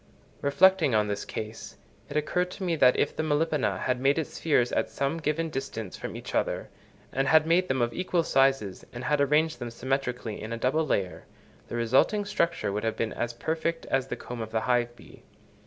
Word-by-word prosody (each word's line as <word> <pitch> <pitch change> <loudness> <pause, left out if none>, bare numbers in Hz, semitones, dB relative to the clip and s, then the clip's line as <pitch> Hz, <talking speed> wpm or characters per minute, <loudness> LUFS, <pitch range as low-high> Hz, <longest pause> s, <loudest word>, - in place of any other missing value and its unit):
Reflecting 150 -1 +4
on 105 -1 +3
this 100 0 -3
case, 110 +1 -7 0.3
it 145 - -2
occurred 180 +4 0
to 190 - -7
me 175 -2 +1
that 130 -5 +5
if - - +1
the - - -1
Melipona 150 - +1
had 125 -1 0
made 135 +3 +3
its 160 - -2
spheres 125 -7 +2
at - - 0
some 140 +4 -2
given 160 +1 -1
distance 115 -8 -5
from - - -6
each - - -7
other, - - -1 0.4
and 135 +1 0
had 155 +2 +5
made 175 +3 +3
them 130 -2 +1
of 120 - -1
equal 180 -2 0
sizes 135 -10 +2
and 120 +1 -6
had 150 -1 +1
arranged 150 0 +2
them 120 -1 -4
symmetrically 125 -2 -3
in 110 - -6
a 115 - -2
double 150 +7 +1
layer, 95 -7 -1 0.4
the - - -5
resulting 130 - +2
structure 170 - 0
would 105 +1 -2
have 110 -1 -1
been 115 - -1
as 120 - -2
perfect 160 +6 -2
as 135 -1 +1
the - - -3
comb 120 -1 -7
of 110 - -5
the 110 0 -1
hive 120 -1 +1
bee. - - -16
135 Hz, 205 wpm, -27 LUFS, 120-160 Hz, 0.4 s, that